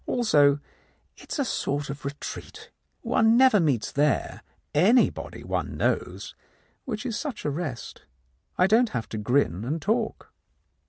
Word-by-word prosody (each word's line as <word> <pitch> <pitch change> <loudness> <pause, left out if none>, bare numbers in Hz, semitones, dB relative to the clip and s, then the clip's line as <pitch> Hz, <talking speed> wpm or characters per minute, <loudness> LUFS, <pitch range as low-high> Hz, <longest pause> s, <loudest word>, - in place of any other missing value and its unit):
Also, 145 - +3 0.6
it - - -15
is - - -2
a 280 - 0
sort 145 - -2
of 145 +1 -9
retreat. 435 - -7 0.3
One 225 +1 +3
never 255 -5 +6
meets 140 - 0
there 145 +1 0 0.3
anybody 210 - +2
one - - -3
knows, - - -2 0.5
which 220 -2 -4
is 235 -4 -2
such 270 - -5
a 145 - 0
rest. 140 -6 -5 0.6
I 180 - +5
don't 225 +4 +4
have 115 - -4
to 110 - -4
grin 105 -4 +1
and 150 +7 -2
talk." 220 +6 -2
170 Hz, 145 wpm, -26 LUFS, 140-230 Hz, 0.6 s, never